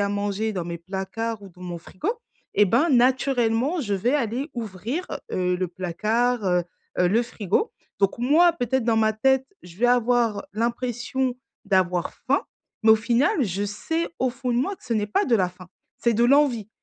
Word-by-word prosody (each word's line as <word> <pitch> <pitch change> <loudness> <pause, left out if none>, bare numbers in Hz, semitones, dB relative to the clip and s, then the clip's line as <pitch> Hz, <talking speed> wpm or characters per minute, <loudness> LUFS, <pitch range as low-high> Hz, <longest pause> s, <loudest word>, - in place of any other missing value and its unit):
à 200 - +1
manger 205 +2 -1
dans 180 -4 -3
mes 170 -1 -5
placards 195 +5 -4
ou 195 - -10
dans 180 0 -19
mon 175 -1 -5
frigo 190 - -3 0.4
et 205 - +6
ben, 240 - +3
naturellement, 255 +3 +2
je 205 -6 -1
vais 235 +9 +1
aller 260 +1 -1
ouvrir, 230 - -4 0.2
heu, 180 -1 0
le 180 -1 -1
placard, 215 +7 0
heu 180 -1 +2 0.3
heu, 180 - +4
le 225 +5 +3
frigo. 235 - -1 0.3
Donc 195 +3 +2
moi, 315 +8 +5
peut-être 260 -4 0
dans 230 -1 +2
ma 220 0 +3
tête, 265 +4 +2 0.2
je 175 0 -13
vais 245 +3 +2
avoir 240 -3 +2
l'impression 245 +3 -1 0.3
d'avoir 180 -2 +1
faim - - 0 0.4
mais 220 - +7
au 220 - +8
final, 245 - +2
je 200 +1 -2
sais, 320 +12 -2
au 255 - +2
fond 250 +1 -4
de - - +1
moi, 320 +11 0
que - - -22
ce 230 - -1
n'est 210 -1 0
pas 390 - +1
de 245 - +2
la 185 -2 +1
faim. 180 0 -14 0.3
C'est 235 -1 +2
de 235 +3 +3
l'envie 245 -5 +3
225 Hz, 195 wpm, -24 LUFS, 195-250 Hz, 0.4 s, au